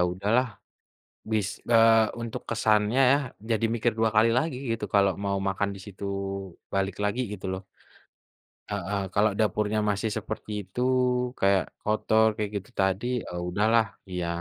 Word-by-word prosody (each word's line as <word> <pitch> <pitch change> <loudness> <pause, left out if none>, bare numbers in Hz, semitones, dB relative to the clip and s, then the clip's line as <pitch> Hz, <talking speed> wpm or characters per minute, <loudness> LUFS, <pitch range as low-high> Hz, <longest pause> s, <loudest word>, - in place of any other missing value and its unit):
udahlah 105 +7 +1 0.9
bis 105 -3 +1 0.2
eee, 115 -1 +6
untuk 115 -1 -5
kesannya 110 +1 +2
ya 140 - +5 0.3
jadi 115 0 +2
mikir 120 +1 +1
dua 110 - +3
kali 110 +2 +5
lagi 160 -5 0 0.2
gitu 115 -2 -3
kalau 100 -1 +5
mau 100 0 0
makan 100 +1 -1
di - - -10
situ, 100 -1 -10 0.7
balik 95 -1 0
lagi 105 +5 0
gitu 95 -1 -8
loh. 95 0 -6 1.1
Heeh, 100 0 -2
kalau 105 +1 +3
dapurnya 105 0 +1
masih 105 +2 -1
seperti 110 +1 -6
itu, 95 +4 -7 0.6
kayak 95 -1 +4 0.2
kotor 110 +1 +2
kayak 105 -1 -2
gitu 95 - -6
tadi, 95 +4 +1 0.2
eee, 90 0 -5
udahlah 110 +5 +3 0.3
iya 90 -1 -2
105 Hz, 145 wpm, -27 LUFS, 100-110 Hz, 1.1 s, eee